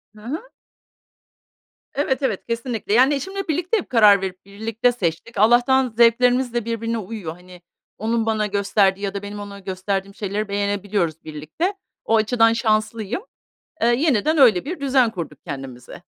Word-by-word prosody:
Hı 210 - -15
hı. 310 - -6 1.5
Evet, 280 -1 0
evet, 235 -8 -1
kesinlikle. 230 -3 -3
Yani, 260 +5 +5
eşimle 385 +7 -4
birlikte 345 +7 0
hep 405 - -5
karar 210 -5 +6
verip, 185 -1 -6
birlikte 220 +4 -1
seçtik. 205 0 -3
Allah'tan 245 +3 +4
zevklerimiz 245 +1 +4
de 240 -2 -1
birbirine 230 0 -2
uyuyor. 205 -6 -6
Hani, 180 0 -15 0.4
onun 225 +2 -1
bana 215 -1 0
gösterdiği 200 -1 +1
ya 200 -1 -2
da 200 - -4
benim 205 +1 -7
ona 200 -1 -8
gösterdiğim 195 +1 -3
şeyleri 205 +1 -3
beğenebiliyoruz 200 -4 -1
birlikte. 155 - -3 0.3
O 225 - +2
açıdan 225 +1 +3
şanslıyım. 215 - -1 0.6
Eee, 230 - +3
yeniden 275 +3 +2
öyle 235 -9 +5
bir 340 +3 -5
düzen 265 -4 +2
kurduk 165 -7 -6
kendimize. 135 -5 -8
220 Hz, 150 wpm, -21 LUFS, 200-245 Hz, 1.5 s, karar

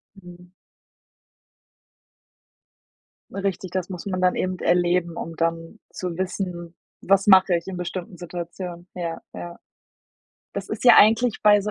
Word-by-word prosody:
Mhm. 180 -1 -14 2.8
Richtig, 195 -2 -3
das 185 0 -3
muss 180 0 -7
man 185 -2 -2
dann 180 0 +3
eben 185 -1 -2
erleben, 175 -1 +1
um 165 -1 -6
dann 165 +4 -2
zu 180 -2 -5
wissen: 180 -2 -4 0.3
„Was 195 +1 +2
mache 190 -2 +6
ich 170 - -3
in 190 -1 -5
bestimmten 180 +2 -6
Situationen?“. 175 0 -7
Ja, 170 -2 -5
ja. 175 0 -8 1.0
Das - - -5
ist - - -5
ja 245 - +9
eigentlich 225 +2 +5
bei 205 -1 +6
so 210 - -3
180 Hz, 135 wpm, -23 LUFS, 175-195 Hz, 2.8 s, ja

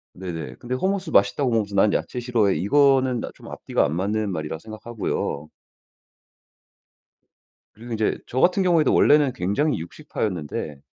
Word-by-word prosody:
네네. 90 -3 -6
근데 125 +1 -4
hummus 190 +4 -1
맛있다고 100 +7 +3
먹으면서 105 -3 0
"난 100 +1 +4
야채 125 - -2
싫어해." 115 -5 +1
이거는 130 +2 +3
나 - - -5
좀 - - -15
앞뒤가 - - -1
안 75 +2 -2
맞는 105 +2 -1
말이라 80 -1 -4
생각하고요. 110 -8 -4 2.3
그리고 120 +2 -11
인제 110 -1 0
저 130 - -2
같은 180 +5 +3
경우에도 170 -6 +3
원래는 145 -4 +4
굉장히 105 - 0
육식파였는데 80 -3 -5
110 Hz, 370 characters per minute, -23 LUFS, 95-130 Hz, 2.3 s, 난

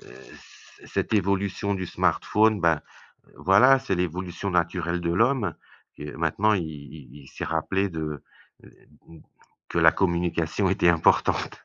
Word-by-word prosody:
c - - -17
cette - - -3
évolution 100 0 0
du 95 -1 -4
smartphone, 110 +4 +1
ben, 80 -3 +2 0.6
voilà, 125 +9 +5
c'est 100 - -2
l'évolution 90 +2 -3
naturelle 85 0 -1
de 85 0 -1
l'homme. 115 - +1 0.4
Que 75 0 -8
maintenant, 85 +7 +1
il 95 -5 0
il 75 -2 -11
il 65 - -16
s'est - - -7
rappelé 95 +5 -1
de, 80 -4 -5 0.4
heu, - - -17 0.4
mmh, 85 - -14 0.5
que - - -2
la - - +6
communication 85 0 0
était 90 -2 +2
importante. 85 -2 +1
90 Hz, 140 wpm, -25 LUFS, 80-100 Hz, 0.6 s, la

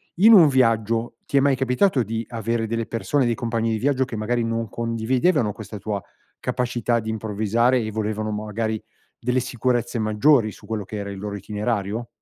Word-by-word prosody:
in 215 +6 +7
un 175 -7 +9
viaggio 115 -3 +1
ti 140 - +1
è - - +7
mai 140 0 +3
capitato 130 +4 +2
di 115 +1 -3
avere 115 0 -1
delle 115 +1 -2
persone, 130 +4 0
dei 120 -1 +1
compagni 115 -1 -1
di 110 - 0
viaggio, 135 +2 +1
che 130 -3 -6
magari 115 +3 0
non 115 0 -2
condividevano 115 - +1
questa 105 0 -8
tua 100 0 -3 0.4
capacità 120 -1 0
di 110 0 -4
improvvisare 110 +3 +1
e 110 -1 -3
volevano 110 0 -2
magari 110 +1 -3 0.4
delle 125 +2 +1
sicurezze 120 -1 -1
maggiori 110 +2 +3
su 105 - -15
quello 105 -2 -3
che 105 - -8
era 100 -1 -4
il 100 - -7
loro 100 0 -4
itinerario? 105 +2 -3
115 Hz, 180 wpm, -23 LUFS, 110-125 Hz, 0.4 s, un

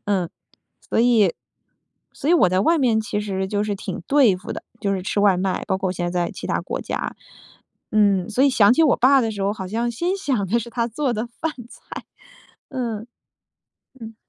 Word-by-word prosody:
嗯， 190 -4 0 0.6
所 - - +1
以 225 -7 +4 0.8
所 280 - -4
以 - - +6
我 260 - +5
在 185 +1 +1
外 330 +11 +3
面 235 -6 +2
其 215 -1 -3
实 190 -2 -2
就 205 +1 -1
是 210 -1 -1
挺 190 -1 -5
对 270 -9 +5
付 185 - -7
的， - - -7 0.2
就 200 -2 0
是 190 - -1
吃 200 +2 -1
外 200 -2 +4
卖， 185 +1 -1
包 190 - 0
括 190 -1 -1
现 175 -1 -3
在 175 -1 0
在 - - -6
其 - - -7
他 - - 0
国 - - -4
家。 - - -4 0.8
嗯， 200 -2 +3
所 245 +5 +1
以 280 - +5
想 215 -4 +5
起 325 - +3
我 300 -5 +4
爸 265 +3 +5
的 225 -3 0
时 205 -2 -4
候， 200 +1 +1
好 190 -3 -6
像 230 +4 -1
心 345 +11 -1
想 260 - -1
的 235 +5 +2
是 235 +1 -6
他 235 0 -1
做 260 +3 -1
的 225 +1 -3
饭 305 +7 -4 0.2
菜。 - - -10 0.6
嗯。 235 -5 -4 0.9
嗯。 225 -1 -9
215 Hz, 225 characters per minute, -22 LUFS, 195-245 Hz, 0.9 s, 以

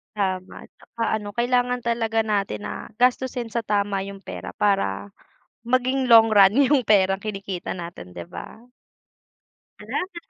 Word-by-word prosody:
Tama, 185 -2 -3
'tsaka 230 -1 -8 0.2
ano 205 -1 -8
kailangan 245 0 +1
talaga 225 -1 0
natin 200 - -2
na 100 - -6
gastusin 250 -1 0
sa 235 - 0
tama 205 -2 0
yung 200 0 -10
pera - - -8
para 100 - 0 0.5
maging 255 +2 +1
long 230 -2 +7
run 200 -2 +6 0.2
yung 275 -5 +3
perang 195 -2 +4
kinikita 195 -3 -5
natin, 170 - -8
'di 85 -1 -9
ba? - - -9 1.2
Salamat. 365 -1 -4
210 Hz, 135 wpm, -23 LUFS, 195-240 Hz, 1.2 s, long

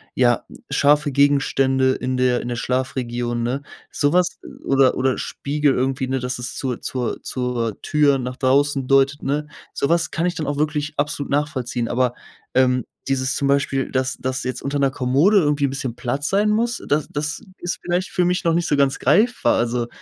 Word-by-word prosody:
ja, 120 -2 +3 0.3
scharfe 145 +2 +3
Gegenstände 135 -1 +3
in 130 0 -2
der 125 -1 +2
in 120 - -5
der 120 - -2
Schlafregion, 120 -2 -2
ne. 125 +4 -1 0.3
Sowas 175 +5 +1 0.3
oder 135 -1 +4
oder 130 0 +1
Spiegel 145 0 0
irgendwie, 130 +1 -1
ne, 130 +1 -1
dass 125 0 -3
es 125 0 -5
zur 130 -3 -3
zur 125 -2 -3
zur 125 -4 -3
Tür 145 -2 +3
nach 125 -1 -4
draußen 135 +1 +2
deutet, 135 +2 +3
ne? 145 +2 -1 0.3
Sowas 170 +4 +1
kann 165 - -1
ich 180 0 -1
dann 160 - -3
auch 145 +1 -2
wirklich 150 0 -1
absolut 145 -1 -2
nachvollziehen. 130 -5 -1
Aber, 125 0 +1 0.4
ähm, 125 -1 +3 0.3
dieses 130 0 0
zum 140 - 0
Beispiel, 140 -1 +1
dass 130 0 -1
dass 130 0 -3
jetzt 130 0 -3
unter 140 +1 -2
'ner 135 -1 +2
Kommode 140 +10 +3
irgendwie 150 -5 +2
'n - - 0
bisschen 135 -3 -4
Platz 135 +5 -2
sein 205 +2 +2
muss, 230 +3 0
das 150 +1 +1
das 150 0 -3 0.2
ist 175 +1 -3
vielleicht 180 +1 -1
für 180 - +1
mich 180 +2 0
noch 165 -2 +2
nicht 170 +1 +1
so 145 - +2
ganz 140 -1 +2
greifbar. 240 +5 +3
Also, 120 0 0
135 Hz, 185 wpm, -21 LUFS, 130-150 Hz, 0.4 s, oder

